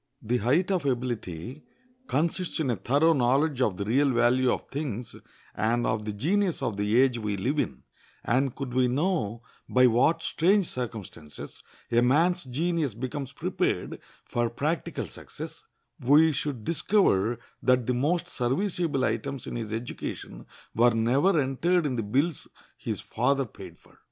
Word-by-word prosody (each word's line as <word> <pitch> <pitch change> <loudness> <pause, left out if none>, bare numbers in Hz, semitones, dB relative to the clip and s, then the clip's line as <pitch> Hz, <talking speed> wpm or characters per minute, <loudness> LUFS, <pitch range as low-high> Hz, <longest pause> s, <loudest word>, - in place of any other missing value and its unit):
The 120 +3 +1
height 145 - +2
of 185 -5 +1
ability 120 - -3 0.5
consists 170 -3 0
in 140 -6 +1
a - - 0
thorough 140 - +3
knowledge 135 +1 +2
of 100 -7 +1
the 100 - -3
real 135 +6 +3
value 125 +1 +3
of - - -2
things 125 -6 -4 0.4
and 120 +2 0
of 110 -1 -1
the 105 - -2
genius 175 - 0
of 115 -5 -1
the 105 +3 +2
age 130 -2 +3
we 105 -2 -2
live 135 +10 -1
in, - - -3 0.4
and 130 +2 +1
could 135 -3 -5
we 130 0 +3
know 125 - -1 0.3
by 125 0 +5
what 130 +8 +3
strange 190 +4 +3
circumstances 105 - -6 0.3
a 120 0 +4
man's 165 +7 +3
genius 150 - -1
becomes 130 +2 -5
prepared - - -2 0.3
for 120 -1 -1
practical 150 +8 -2
success, - - -9 0.3
we 150 +5 +5
should 140 -5 -3
discover 155 - +2 0.2
that 125 -2 +3
the 125 - +1
most 160 +8 0
serviceable 145 +1 0
items 140 -3 -3
in - - -6
his 115 -3 -4
education 115 +2 -6 0.3
were 120 0 +4
never 135 +11 +3
entered 160 +6 +1
in 135 -4 -1
the 115 - -1
bills 140 +10 -1 0.3
his - - -4
father 135 +3 0
paid 110 - -12
for. - - -24
130 Hz, 155 wpm, -27 LUFS, 120-155 Hz, 0.5 s, by